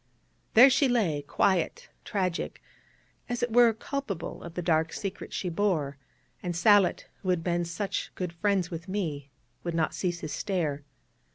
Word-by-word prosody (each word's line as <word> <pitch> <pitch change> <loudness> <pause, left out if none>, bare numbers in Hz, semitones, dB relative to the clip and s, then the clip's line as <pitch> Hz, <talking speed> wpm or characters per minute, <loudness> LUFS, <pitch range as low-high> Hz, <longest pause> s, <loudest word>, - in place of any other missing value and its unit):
There 255 +4 +9
she 275 +1 +4
lay, 190 -12 +1
quiet, 175 +4 0 0.2
tragic, 185 -3 -2 0.7
as 245 0 -2
it 240 -2 -1
were 240 -1 +7
culpable 220 - -5
of 170 -1 -9
the 180 - -3
dark 160 -1 +2
secret 195 -2 -5
she 185 - -3
bore; 165 -6 0 0.5
and 175 -2 -3
Sallitt, 195 +2 +4 0.2
who 185 - -3
had 180 -3 +1
been 175 0 0
such 190 +4 -3
good 180 -2 -3
friends 190 0 0
with 165 +1 -6
me, 160 -8 -3 0.3
would 170 -1 -3
not 160 -1 +1
cease 175 -2 -2
his 155 - -4
stare. 165 -8 -1
180 Hz, 160 wpm, -28 LUFS, 165-205 Hz, 0.7 s, There